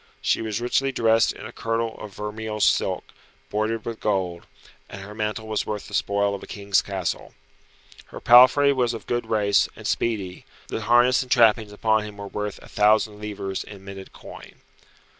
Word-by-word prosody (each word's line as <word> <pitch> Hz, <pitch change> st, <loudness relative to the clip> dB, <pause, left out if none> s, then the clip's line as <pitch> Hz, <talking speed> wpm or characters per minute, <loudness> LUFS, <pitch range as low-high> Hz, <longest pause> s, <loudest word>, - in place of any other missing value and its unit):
She -, -, 0 dB
was 110 Hz, -1 st, -3 dB
richly 135 Hz, +3 st, 0 dB
dressed 115 Hz, -3 st, +3 dB
in -, -, -10 dB
a 110 Hz, -, -8 dB
kirtle 115 Hz, -1 st, -2 dB
of 100 Hz, -2 st, -9 dB
vermeil 105 Hz, +1 st, -5 dB
silk, -, -, +1 dB, 0.4 s
broidered 110 Hz, +1 st, -1 dB
with 115 Hz, -1 st, -5 dB
gold, 95 Hz, -4 st, -2 dB, 0.4 s
and 95 Hz, -, -9 dB
her 105 Hz, +2 st, -10 dB
mantle 110 Hz, +1 st, -3 dB
was 110 Hz, -1 st, -2 dB
worth 105 Hz, -1 st, -4 dB
the -, -, -13 dB
spoil 100 Hz, 0 st, +1 dB
of 100 Hz, -, -5 dB
a -, -, -10 dB
king's 100 Hz, -1 st, 0 dB
castle. 95 Hz, -3 st, -4 dB, 0.7 s
Her -, -, -10 dB
palfrey 130 Hz, +4 st, +7 dB
was 120 Hz, -3 st, 0 dB
of 110 Hz, -, -9 dB
good 120 Hz, 0 st, -2 dB
race, 100 Hz, -2 st, +2 dB
and -, -, -12 dB
speedy; 100 Hz, -6 st, -2 dB, 0.3 s
the -, -, -3 dB
harness 120 Hz, +3 st, +4 dB
and 130 Hz, -, -7 dB
trappings 110 Hz, -3 st, +4 dB
upon 110 Hz, +1 st, +1 dB
him 105 Hz, -1 st, -9 dB
were 100 Hz, -, -7 dB
worth 105 Hz, 0 st, -4 dB
a -, -, -13 dB
thousand 105 Hz, 0 st, +2 dB
livres 100 Hz, -2 st, -4 dB
in 100 Hz, -2 st, -12 dB
minted 95 Hz, -1 st, -9 dB
coin. -, -, -13 dB
105 Hz, 180 wpm, -24 LUFS, 100-115 Hz, 0.7 s, palfrey